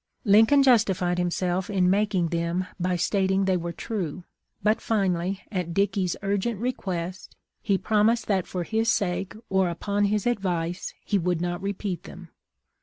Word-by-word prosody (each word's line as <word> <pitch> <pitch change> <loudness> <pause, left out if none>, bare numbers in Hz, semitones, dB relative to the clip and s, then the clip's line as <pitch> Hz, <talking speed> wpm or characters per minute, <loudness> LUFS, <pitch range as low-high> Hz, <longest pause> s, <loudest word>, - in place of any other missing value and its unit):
" - - -43
Lincoln 250 +6 +6
justified 190 -8 +3
himself 180 +1 -1
in 190 -3 +2
making 195 -3 +2
them 170 +2 -1
by 180 0 0
stat 190 +2 +1
ing 190 0 +2
they 190 -1 +2
were 170 -1 -2
true; 180 -4 -4 0.4
but 215 +1 +2
finally, 190 -3 0
at 180 -4 -3
Dickey's 195 -2 +1
urgent 200 +2 -1
request, 190 -7 -4 0.3
he 195 - +1
promised 220 +4 +2
that 190 -4 0
for 180 -2 -3
his 225 +4 +1
sake, 195 +1 -1
or 190 -2 +2
upon 200 +4 -1
his 205 0 0
advice, 180 -7 -2
he 205 - +1
would 175 -1 0
not 175 0 -2
repeat 195 -3 -3
them. 180 -2 -11
190 Hz, 160 wpm, -26 LUFS, 175-205 Hz, 0.4 s, Lincoln